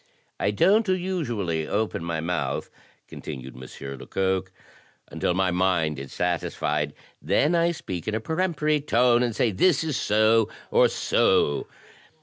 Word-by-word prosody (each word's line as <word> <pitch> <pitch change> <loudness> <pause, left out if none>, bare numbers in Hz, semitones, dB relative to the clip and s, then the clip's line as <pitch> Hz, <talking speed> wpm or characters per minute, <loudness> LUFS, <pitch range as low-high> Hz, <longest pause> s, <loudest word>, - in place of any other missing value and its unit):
"I - - +1
don't 215 +3 +3
usually 120 - -1
open 105 -5 -1
my 85 -1 -2
mouth," 85 +1 -2 0.4
continued 65 -1 -8
M. 65 +1 -10 0.3
Lecoq, 95 -1 -1 0.6
"until 90 - -1
my 95 -1 +1
mind 90 -5 +1
is 70 -1 -8
satisfied; 75 -4 -1 0.3
then 100 - +2
I 170 0 +3
speak 90 - -6
in 110 - -1
a - - 0
peremptory 155 +1 0
tone, 120 -3 +3
and 120 -3 0
say 115 0 +2
this 160 - +3
is 155 -4 -2
so 110 +1 +3 0.2
or - - +5
so. 70 - +1
105 Hz, 135 wpm, -25 LUFS, -, 0.6 s, or